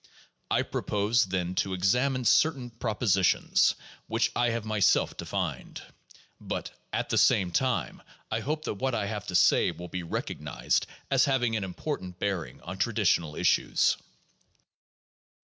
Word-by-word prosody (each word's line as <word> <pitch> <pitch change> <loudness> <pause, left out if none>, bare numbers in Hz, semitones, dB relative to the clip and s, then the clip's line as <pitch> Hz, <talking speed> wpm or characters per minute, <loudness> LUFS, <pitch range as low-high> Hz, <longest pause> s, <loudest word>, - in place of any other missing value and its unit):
I - - +2
propose, 105 +3 +1
then, 90 -2 -2
to 95 -1 -3
ex 95 +3 +3
amine 130 0 0
certain 135 -5 +3
propositions 110 -5 +2 0.3
which - - +1
I 120 0 +2
have 115 -1 -2
myself 110 -2 +2
defined. - - -4 0.6
But, - - -5 0.2
at - - -2
the - - +2
same 90 -2 +3
time, 130 +6 -1 0.3
I 110 - 0
hope 150 +6 -3
that - - -2
what 130 -2 0
I 105 -3 -1
have 105 0 -5
to 90 - -3
say 85 - +5
will 90 0 -7
be 90 +2 -4
recognized 85 - -2 0.2
as - - +4
hav 135 -3 +1
ing 115 -2 +1
an 105 - -1
important 95 - -5
bearing 90 -10 -3
on 95 +2 -7
traditional 85 -9 +1
issues. - - +2
105 Hz, 150 wpm, -28 LUFS, 90-120 Hz, 0.6 s, say